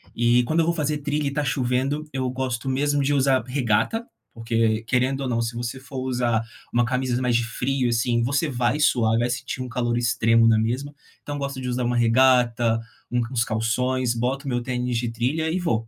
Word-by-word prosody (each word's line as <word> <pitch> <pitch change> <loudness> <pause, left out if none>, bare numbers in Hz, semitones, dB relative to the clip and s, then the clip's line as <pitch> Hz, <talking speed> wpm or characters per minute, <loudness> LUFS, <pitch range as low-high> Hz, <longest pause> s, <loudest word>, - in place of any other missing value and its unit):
E, 120 +1 +3
quando 155 +7 0
eu - - +1
vou 170 - +1
fazer 150 -2 -1
trilha, 145 +1 -2
e - - +1
está 145 +2 -1
chovendo, 135 +2 -1
eu 130 -1 -1
gosto 130 -1 -3
mesmo 145 +2 +1
de 145 +2 +1
usar 135 -3 +3
regata, 130 - 0 0.3
porque 115 -1 0
querendo 130 +3 0
ou 135 - -2
não, 115 -1 0
se 115 0 -3
você 120 +2 -4
for 135 +1 -10
usar 125 -3 0 0.3
um 120 - +3
camisa 125 0 -1
mais 125 -2 +1
de 120 - +2
frio, 125 +2 -1
assim, 120 0 +1
você 140 +6 0
vai 125 +2 0
suar, 115 -6 +3
vai 120 +1 +1
sentir 130 +1 -4
um 130 - -4
calor 120 0 -1
extremo 115 -1 +3
na 115 -1 +5
mesma. 125 +6 -2 0.3
Então 145 - -5
eu - - -5
gosto 140 -1 -4
de 125 - -4
usar 125 0 -1
um 120 - +1
regata, 120 -1 +3 0.3
u 125 - 0
uns 120 -2 +1
calções, 120 +2 0
boto 130 +4 -2
meu 120 -2 -1
tênis 125 -1 -2
de 120 0 -1
trilha 130 +8 -1
e 175 - 0
vou. 115 -10 -1
125 Hz, 210 wpm, -24 LUFS, 120-135 Hz, 0.3 s, na